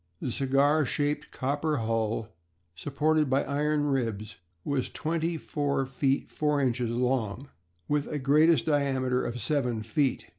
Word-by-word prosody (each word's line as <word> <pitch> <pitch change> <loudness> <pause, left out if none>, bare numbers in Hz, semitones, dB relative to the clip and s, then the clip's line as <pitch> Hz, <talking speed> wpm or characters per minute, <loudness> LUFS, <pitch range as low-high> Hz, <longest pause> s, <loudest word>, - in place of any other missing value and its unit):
The 125 - -3
cigar 140 +4 +2
shaped 145 +2 -1
copper 145 +3 -1
hull, 115 -1 -1 0.4
supported 150 - 0
by 135 +1 +2
iron 150 +1 0
ribs, 115 -7 -2 0.3
was 140 -3 -1
twenty 165 +1 -2
four 145 -3 -1
feet 135 +1 -1
four 150 -1 0
inches 125 -3 0
long, 125 0 -1 0.4
with 145 -1 0
a 150 - -3
greatest 150 +4 +4
diameter 130 -4 +1
of 120 +1 -4
seven 125 -3 0
feet. 130 +4 0
140 Hz, 135 wpm, -28 LUFS, 125-150 Hz, 0.4 s, greatest